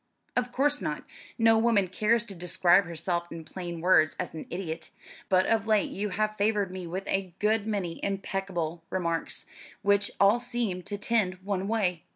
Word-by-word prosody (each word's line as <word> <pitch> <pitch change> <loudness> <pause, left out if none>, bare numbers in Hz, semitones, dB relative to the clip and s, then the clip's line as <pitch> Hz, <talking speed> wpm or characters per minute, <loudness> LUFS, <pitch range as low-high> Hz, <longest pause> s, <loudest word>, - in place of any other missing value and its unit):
"Of 245 0 0
course 290 +3 +2
not; - - -3 0.3
no 225 -1 +5
woman 220 -4 +3
cares 215 +5 +2
to 220 -4 -8
describe 180 +1 +3
herself 170 +1 -2
in 165 -1 -7
plain 175 -1 -6
words 165 -3 +4
as 180 - -3
an 160 - -7
idiot; 170 -2 -5 0.4
but 185 0 +4
of 225 -1 +1
late 215 -2 +2
you 205 +2 -2
have 215 +2 -1
favoured 205 -2 +1
me 185 -2 -6
with 185 +3 -5
a 190 -3 -1
good 215 0 +1
many 195 -6 -2
imbecile 195 -4 -3
remarks, 170 -3 -2 0.4
which 200 0 +3
all 200 +4 +5
seem 240 -7 -1
to 205 +3 -5
tend 205 -3 +1
one 195 -1 -2
way. 195 -6 0
195 Hz, 175 wpm, -28 LUFS, 180-215 Hz, 0.4 s, no